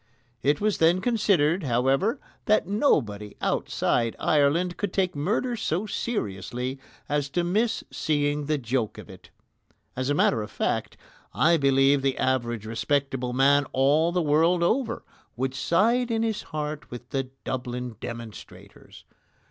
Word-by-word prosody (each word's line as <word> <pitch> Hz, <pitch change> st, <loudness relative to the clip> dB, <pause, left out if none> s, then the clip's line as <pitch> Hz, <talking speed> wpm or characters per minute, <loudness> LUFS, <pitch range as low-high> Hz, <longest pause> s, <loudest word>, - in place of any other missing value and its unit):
It 145 Hz, +3 st, +2 dB
was 210 Hz, 0 st, 0 dB
then 165 Hz, +3 st, +4 dB
considered, 195 Hz, -7 st, +2 dB
however, 135 Hz, -, +1 dB, 0.3 s
that 215 Hz, -4 st, +3 dB
nobody 105 Hz, -, 0 dB
outside 115 Hz, -2 st, 0 dB
Ireland 160 Hz, +5 st, +2 dB
could 205 Hz, -3 st, -3 dB
take 185 Hz, -2 st, 0 dB
murder 215 Hz, -, 0 dB
so 200 Hz, -3 st, -1 dB
seriously 125 Hz, -, -3 dB, 0.3 s
as 145 Hz, -1 st, -1 dB
to 175 Hz, +5 st, 0 dB
miss 215 Hz, +7 st, 0 dB
seeing 145 Hz, -1 st, 0 dB
the 155 Hz, 0 st, +1 dB
joke 120 Hz, -3 st, -2 dB
of -, -, -10 dB
it. -, -, -15 dB, 0.7 s
As 130 Hz, +1 st, -2 dB
a 145 Hz, -, +2 dB
matter 115 Hz, -5 st, +2 dB
of 105 Hz, -, -6 dB
fact, -, -, -2 dB, 0.4 s
I 170 Hz, +2 st, +4 dB
believe 135 Hz, 0 st, +3 dB
the 135 Hz, -1 st, 0 dB
average 120 Hz, -4 st, -1 dB
respectable 130 Hz, +2 st, -1 dB
man 140 Hz, +2 st, +4 dB
all 145 Hz, +5 st, +3 dB
the 180 Hz, -1 st, 0 dB
world 165 Hz, +4 st, +3 dB
over 235 Hz, +8 st, 0 dB, 0.3 s
would 130 Hz, +1 st, -2 dB
side 230 Hz, -, +2 dB
in 225 Hz, -1 st, 0 dB
his 225 Hz, -2 st, -1 dB
heart 150 Hz, -1 st, -4 dB
with 120 Hz, 0 st, -10 dB
the 135 Hz, -3 st, -2 dB
Dublin 125 Hz, -2 st, -4 dB
demonstrators. 115 Hz, -3 st, -10 dB
145 Hz, 140 wpm, -26 LUFS, 130-180 Hz, 0.7 s, then